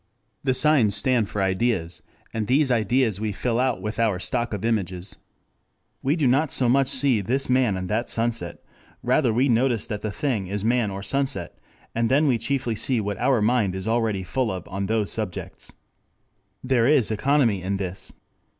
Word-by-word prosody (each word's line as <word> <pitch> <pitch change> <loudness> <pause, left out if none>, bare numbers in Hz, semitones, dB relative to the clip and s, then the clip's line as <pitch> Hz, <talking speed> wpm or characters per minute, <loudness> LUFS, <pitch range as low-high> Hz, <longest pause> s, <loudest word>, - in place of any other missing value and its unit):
The 130 -2 +1
signs 130 -7 +4
stand 115 -2 +2
for 105 -3 -1
ideas, 95 -3 -1 0.3
and 110 -2 -2
these 135 +2 +3
ideas 115 -2 +1
we 110 -1 -1
fill 115 +3 -1
out 130 -2 0
with 105 +1 -4
our 110 -5 +2
stock 120 +4 -1
of 105 0 -3
images. 95 -5 -2 0.8
We 140 +4 +1
do 155 -5 0
not 135 +4 +2
so 125 - +1
much 135 +2 +3
see 130 -4 +2
this 130 +6 -1
man 125 -7 +2
and 95 0 -4
that 110 +5 -1
sunset; 115 -6 -2 0.4
rather 130 -6 +2
we 125 +5 +2
notice 120 -2 +2
that 105 -3 -5
the 110 - -2
thing 110 -5 -2
is 100 +2 -3
man 120 -2 +2
or 100 0 -6
sunset, 135 - -2 0.3
and 115 0 0
then 145 +4 +3
see 140 +4 0
chiefly 120 0 -1
what 105 -1 -3
our 125 -4 +2
mind 110 -5 +2
is 95 +2 -5
already 110 -4 0
full 125 +5 -1
of 90 -2 -6
on 95 0 -3
those 110 -1 0
subjects. 105 -5 -4
3 - - -17 0.9
There 125 -2 +2
is 140 -7 +3
economy 115 -3 +2
in 95 +2 -2
this. 95 -1 -4
115 Hz, 185 wpm, -24 LUFS, 100-130 Hz, 0.9 s, signs